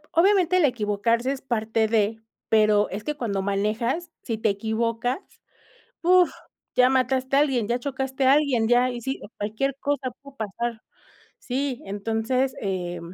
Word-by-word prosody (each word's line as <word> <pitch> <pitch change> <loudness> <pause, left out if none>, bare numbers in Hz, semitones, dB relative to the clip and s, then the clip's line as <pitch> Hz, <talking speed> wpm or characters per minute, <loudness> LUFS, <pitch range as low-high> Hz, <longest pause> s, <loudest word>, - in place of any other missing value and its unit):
obviamente, 365 0 +4
el 360 - +4
equivocarse 230 0 +1
es 275 - -6
parte 225 -3 0
de, 220 0 +1 0.3
pero, 215 -1 +4
es 205 +2 -5
que 300 - -2
cuando 225 -8 -2
manejas, 215 - -1
si 230 - -2
te 220 0 0
equivocas, 230 - -1 0.8
¡uf!, 360 +1 +5 0.4
ya 250 0 +5
mataste 260 +1 +1
a - - +6
alguien, 260 -7 +1
ya 240 +1 +1
chocaste 265 0 -2
a 265 - +7
alguien, 270 -7 +2
ya, 245 +1 +4
y 245 -1 -5
sí, 265 +3 -3 0.2
cualquier 220 +7 -1
cosa 285 -2 -1
puede 280 -1 -14
pasar. 220 +2 -4 0.6
Sí, 265 +1 -3
entonces, 225 +6 -1
eh, 180 -3 -3
240 Hz, 150 wpm, -25 LUFS, 220-270 Hz, 0.8 s, a